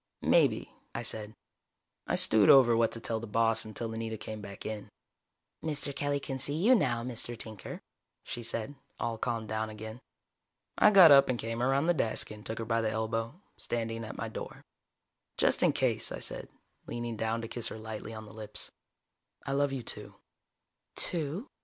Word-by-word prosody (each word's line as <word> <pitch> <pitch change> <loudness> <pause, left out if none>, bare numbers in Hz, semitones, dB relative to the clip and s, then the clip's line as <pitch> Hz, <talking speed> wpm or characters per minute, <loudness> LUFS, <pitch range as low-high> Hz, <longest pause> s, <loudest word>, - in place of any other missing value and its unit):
"Maybe," - - +3 0.2
I 120 - -2
said. 110 -1 -3 0.7
I - - +1
stewed 110 -3 +5
over 125 -4 +8
what 115 0 +3
to 115 - -5
tell 115 0 -2
the 115 - -7
boss 115 +1 +3
until 110 +1 -5
Anita 110 0 -4
came 110 0 -7
back 100 -1 -9
in. 110 -1 -5 0.7
"Mr. 145 -3 -2
Kelly 145 0 0
can 135 -1 -5
see 140 +2 +1
you 205 +11 +5
now, 120 - +2
Mr. 120 -1 -4
Tinker," 110 -2 -6 0.4
she 120 - -6
said, 115 +3 -2 0.3
all 115 -1 -2
calmed 115 -3 -2
down 110 0 -1
again. 110 +2 -8 0.7
I - - +6
got 190 -6 +9
up 140 -1 +8
and 125 - +1
came 115 +1 -3
around 135 +4 +2
the 175 - +4
desk 115 -9 0
and 105 0 -10
took 110 - -4
her 115 - -3
by 115 0 +1
the 110 - +1
elbow, 115 - -2 0.2
standing 115 -1 -2
at 110 - -7
my - - -3
door. - - -7 0.7
"Just - - +3
in - - +5
case," - - 0
I - - -3
said, - - -3 0.4
leaning 120 -1 -4
down 115 +1 -1
to - - -4
kiss 120 0 -3
her - - -6
lightly 110 0 -7
on 110 0 -8
the 105 - -13
lips. 105 -1 -3 0.7
"I - - -3
love 140 0 +2
you, 135 -3 -4
too." - - -2 0.8
"Too?" 165 - 0
115 Hz, 185 wpm, -31 LUFS, 110-135 Hz, 0.8 s, got